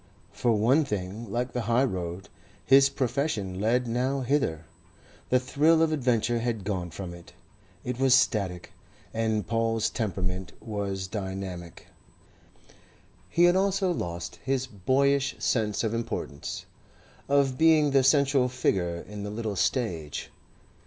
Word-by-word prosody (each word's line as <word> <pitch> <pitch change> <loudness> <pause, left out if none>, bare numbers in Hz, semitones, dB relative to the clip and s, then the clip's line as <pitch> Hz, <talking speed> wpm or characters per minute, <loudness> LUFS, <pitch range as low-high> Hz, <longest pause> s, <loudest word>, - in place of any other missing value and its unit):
For 120 - +1
one 120 +9 +3
thing, 105 -2 -5
like 125 +2 -1
the 125 - -1
high 120 +3 +4
road, 90 -6 -3 0.4
his 135 0 +6
profession 125 -8 -2
led 120 +4 +2
nowhither. 125 - 0 0.6
The 130 - +4
thrill 155 +6 +3
of 160 - +2
adventure 120 -5 +1
had 115 -3 -2
gone 95 -3 -3
from 85 +1 -7
it. 85 0 -13 0.5
It 125 0 -4
was 135 -1 +5
static, 100 -9 0 0.4
and 110 -3 0
Paul's 115 0 0
temperament 95 -4 -3
was 100 -3 -3
dynamic. 95 -3 -6 1.4
He 170 - +3
had 175 +1 +6
also 190 -1 +2
lost 85 - -4
his 135 -1 0
boyish 135 +6 +1
sense 110 -3 0
of 110 -1 -1
importance, 115 -10 -4 0.6
of 140 -2 +3
being 155 -3 +5
the 135 0 +5
central 135 -1 +3
figure 90 -9 -1
in 105 0 -7
the 105 - -4
little 105 -1 -3
stage. 90 - -2
115 Hz, 130 wpm, -27 LUFS, 95-135 Hz, 1.4 s, his